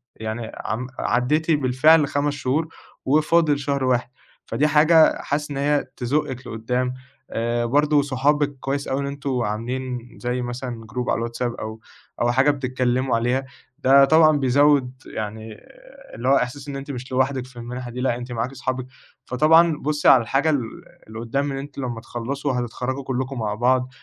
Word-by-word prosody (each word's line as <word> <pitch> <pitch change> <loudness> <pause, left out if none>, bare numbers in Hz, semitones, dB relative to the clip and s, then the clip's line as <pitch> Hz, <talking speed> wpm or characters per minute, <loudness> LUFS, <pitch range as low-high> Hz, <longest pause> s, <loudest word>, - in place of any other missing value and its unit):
يعني 110 +1 -5
عم 120 +4 -3
عدّيتِ 150 +7 +1
بالفعل 145 +2 +4
5 145 +1 0
شهور 145 +3 -1 0.4
وفاضل 150 +1 +3
شهر 140 -1 -1
واحد 125 -1 +1 0.4
فدي 140 +7 +1
حاجة 155 +2 +5
حاسس 150 +1 -2
إن 135 - -4
هي 145 +1 +1
تزقِك 130 0 -2
لقدام، 125 +3 -2 0.4
آآ 120 +1 -1
برضو 145 +3 +3
صحابِك 145 +1 +1
كويس 140 +1 -3
أوي 135 - -1
إن 140 - -3
أنتم 140 -2 -3
عاملين 120 +3 -3
زي 125 +1 -2
مثلًا 120 -1 -5
Group 125 0 -2
على - - +2
الواتساب 120 +1 -3
أو 110 +1 -7 0.4
أو 120 0 +3
حاجة 135 +4 +4
بتتكلموا 130 -2 0
عليها، 125 +3 0 0.3
ده 135 0 +6
طبعًا 155 0 +5
بيزود 140 0 +3
يعني 110 0 -6 0.6
اللي - - -4
هو 140 - +6
احساس 135 +2 -2
إن 140 - -5
أنتِ 140 +1 -6
مش 130 0 -7
لوحدِك 130 0 0
في 130 -1 -17
المنحة 120 +1 -6
دي، 125 - -5
لأ 125 -2 +1
أنتِ 125 0 -8
معاكِ 120 +3 -3
صحابِك، 130 -1 -3 0.4
فطبعًا 160 +4 +4
بُصي 150 +1 -1
على 130 - +8
الحاجة 135 +7 +1
ال 145 -4 +2 0.5
اللي 110 +1 -8
قدام 135 +5 -1
إن 135 - -4
أنتِ 140 +1 -8
لما 120 -4 -4
تخلصوا 130 +4 -3
هتتخرجوا 125 +2 -3
كلكم 130 0 -3
مع 105 -2 -1
بعض، 125 +2 +2
130 Hz, 165 wpm, -22 LUFS, 120-145 Hz, 0.6 s, على